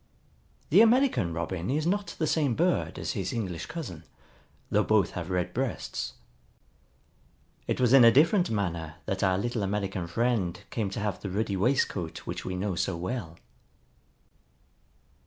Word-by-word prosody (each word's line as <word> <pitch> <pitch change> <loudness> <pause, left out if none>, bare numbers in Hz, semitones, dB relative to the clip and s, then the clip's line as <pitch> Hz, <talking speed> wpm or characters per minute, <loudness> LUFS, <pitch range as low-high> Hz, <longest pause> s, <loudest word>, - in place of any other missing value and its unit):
The 190 +8 +8
American 230 - +4
Robin 85 +2 -3
is 150 +4 0
not 200 +3 -1
the 160 - 0
same 145 -5 +1
bird 175 +2 +1
as - - -3
his - - -3
English 95 -8 -4
cousin, 95 - -6 0.7
though 105 - +4
both 105 -4 +2
have 90 0 -5
red 90 -1 -1
breasts. 130 -1 -3 1.5
It - - -1
was 125 -1 +3
in 135 -3 +9
a 115 - +9
different 170 - +4
manner 85 -7 -2
that 95 -1 -2
our 95 -1 +3
little 120 +2 -2
American 95 -3 -2
friend 105 -2 0
came 110 -4 -1
to 95 - -5
have 105 -3 -2
the 100 - -4
ruddy 100 +1 -1
waistcoat 95 -6 0
which - - -5
we 95 - -4
know 95 +1 -1
so 85 0 -1
well. 90 -2 -4
105 Hz, 155 wpm, -28 LUFS, 90-130 Hz, 1.5 s, in